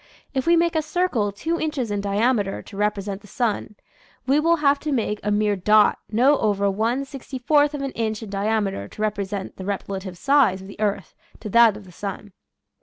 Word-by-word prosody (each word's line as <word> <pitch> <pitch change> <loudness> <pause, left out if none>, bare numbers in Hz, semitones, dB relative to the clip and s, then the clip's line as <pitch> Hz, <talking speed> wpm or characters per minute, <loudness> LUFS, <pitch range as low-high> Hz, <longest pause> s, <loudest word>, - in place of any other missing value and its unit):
If 265 +1 -2
we 340 - +6
make 340 0 +2
a 315 - +3
circle 305 - 0
two 320 +12 -2
inches 285 -8 -2
in 205 -1 -1
diameter 205 0 0
to 200 - -12
represent 205 -1 -2
the 205 - -16
sun 215 -2 -2 0.5
we 275 +3 +3
will 335 +2 +3
have 285 -3 +2
to 305 - -3
make 215 -5 -1
a 210 - -2
mere 210 0 +2
dot 210 +3 +4
not 255 +7 +3
over 200 -2 +1
one 230 +7 0
sixty 270 -1 -8
fourth 290 +3 +3
of 280 - -4
an 275 - -3
inch 220 -2 -3
in 210 - -8
diameter 200 - -1
to 210 - -10
repre 205 -2 -1
sent 195 -1 -6
the 190 - -7
relative 190 -1 -4
size 270 -5 +3
of 190 - -11
the 200 - -12
earth 205 -2 -1 0.3
to 215 - -6
that 230 -2 +6
of 210 - -11
the 185 - -14
sun. 200 +2 -7
215 Hz, 210 wpm, -23 LUFS, 200-275 Hz, 0.5 s, we